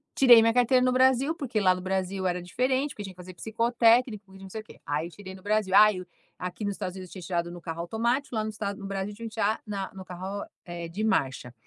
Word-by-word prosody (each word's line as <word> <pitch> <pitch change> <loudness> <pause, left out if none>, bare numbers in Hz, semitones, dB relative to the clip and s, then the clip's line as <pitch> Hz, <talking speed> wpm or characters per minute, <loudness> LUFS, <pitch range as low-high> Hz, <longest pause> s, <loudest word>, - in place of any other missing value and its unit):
tirei 245 -4 +8
minha 230 0 +3
carteira 250 +1 +4
no 255 - +3
Brasil, 260 +4 +3
porque 250 -8 -2
lá 185 -2 +4
no 185 - -6
Brasil 190 0 -2
era 180 -1 0
diferente, 260 +10 0
porque 205 - -7
tinha 195 -1 -8
que - - -31
fazer 180 0 -10
psicotécnico, 230 -2 +2
e - - -12
não 190 0 -10
sei 220 +2 -6
o - - -18
quê. - - -16
Aí 150 +3 -1
eu 175 - -13
tirei 190 -1 -10
no 190 - -15
Brasil. 205 -2 +1
Ai 210 -2 +6
o 180 - -12 0.3
aqui 180 +4 -4
nos 205 - -1
Estados 180 0 -5
Unidos 185 -2 -8
eu - - -12
tinha 185 - -8
tirado 170 -2 -1
no 175 -1 -9
carro 165 -1 -5
automático, 235 +8 -1
lá 215 - 0
no 215 - -3
estado 200 -2 -4
no 195 - -6
Brasil 195 +1 -3
tinha 230 +2 -7
que 215 - -18
tirar 220 0 +1
na 200 -2 -4
no 190 -1 -8
carro, 185 +3 -6 0.2
eh, 170 -1 -6
de 200 +6 -4
marcha. 135 - 0
200 Hz, 270 wpm, -27 LUFS, 185-230 Hz, 0.3 s, tirei